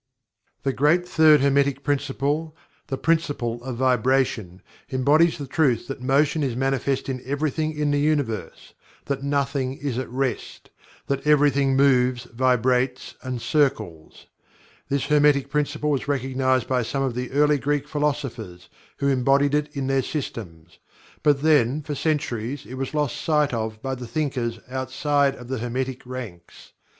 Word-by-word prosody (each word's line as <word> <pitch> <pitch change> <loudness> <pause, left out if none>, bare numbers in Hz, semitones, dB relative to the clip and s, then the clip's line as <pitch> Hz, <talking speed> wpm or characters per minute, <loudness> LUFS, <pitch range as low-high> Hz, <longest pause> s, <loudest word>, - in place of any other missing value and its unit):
The 135 - 0
great 165 +7 +2
Third 155 -4 +5
Hermetic 140 0 +2
Principle 145 +3 -1 0.3
the 135 - -3
Principle 140 -8 -1
of 130 -1 -4
Vibration 125 -7 +1 0.3
embodies 150 +6 +3
the 145 - -5
truth 135 -4 +1
that 135 -2 -6
Motion 140 +4 +2
is 130 -5 -1
manifest 135 +1 -1
in 130 -2 -3
everything 155 +2 -2
in 150 -1 +1
the 145 - +1
Universe 145 -8 -2 0.3
that 140 -1 -2
nothing 140 -1 -1
is 135 -4 -3
at 130 - -5
rest 130 -1 -4 0.3
that 140 +1 -2
everything 140 -2 +4
moves, 130 -3 +3
vibrates, 125 +1 0
and 125 -3 -5
circles. 110 - -1 0.6
This 140 -1 0
Hermetic 145 -2 +3
Principle 150 +1 0
was 140 -2 -1
recognized 130 -2 0
by 130 -1 +1
some 135 +4 -2
of 130 -3 -1
the 125 +1 -4
early 145 +1 +3
Greek 145 +1 -1
philosophers 135 -11 -3 0.3
who 140 - -1
embodied 135 +2 +3
it 150 0 +1
in 135 - -1
their 135 0 +1
systems. 90 - -6 0.4
But, 145 -2 +2
then, 150 -2 +3
for 145 - -4
centuries 140 -3 -2
it 125 - -10
was 135 +2 -4
lost 150 -4 -1
sight 150 -4 +1
of 110 -1 -3
by 135 0 -2
the 125 -2 -6
thinkers 130 -6 -2
outside 135 +2 0
of 120 - -11
the 130 -1 -3
Hermetic 125 +2 -4
ranks. 110 -10 -9
135 Hz, 150 wpm, -24 LUFS, 125-145 Hz, 0.6 s, Third